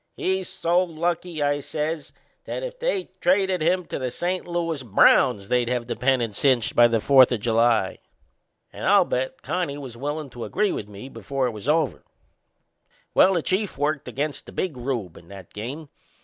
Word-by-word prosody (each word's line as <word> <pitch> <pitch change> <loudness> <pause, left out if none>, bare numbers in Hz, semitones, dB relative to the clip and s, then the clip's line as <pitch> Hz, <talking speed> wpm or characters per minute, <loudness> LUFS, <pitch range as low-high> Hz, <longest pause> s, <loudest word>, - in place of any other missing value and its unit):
He's 190 -1 -1
so 180 -1 +1
lucky," 170 -1 -2
I 145 0 +1
says, 150 +2 -4 0.3
"that - - -4
if - - -6
they 485 - -1
traded 190 -1 +2
him 180 +3 +1
to - - -5
the 130 -1 -2
St. 175 +9 -3
Louis 165 -4 -2
Browns 110 -1 +4
they'd 125 0 +1
have 125 -1 -1
the 120 - -4
pennant 120 -4 +1
cinched 130 -4 +2
by 120 - +7
the 115 -1 +1
Fourth 130 +2 +6
o' 120 - +1
July." 115 -2 +2 0.7
And - - -8
I'll - - +5
bet 130 +1 -3
Connie 175 -6 -2
was 130 -5 -8
willin' 145 +1 -4
to 120 -1 -7
agree 210 -1 0
with 105 - -4
me 100 +5 -9
before 135 -1 -3
it 125 - 0
was 110 +5 -6
over. 155 -3 +1 1.1
Well, 190 0 +5
the 170 - 0
Chief 195 -2 -1
worked 145 +1 -1
against 145 0 -4
the - - -9
Big 180 -7 -3
Rube 120 -8 -4
in 85 - -15
that 95 -2 -12
game. 135 +9 -6
140 Hz, 185 wpm, -24 LUFS, 120-175 Hz, 1.1 s, by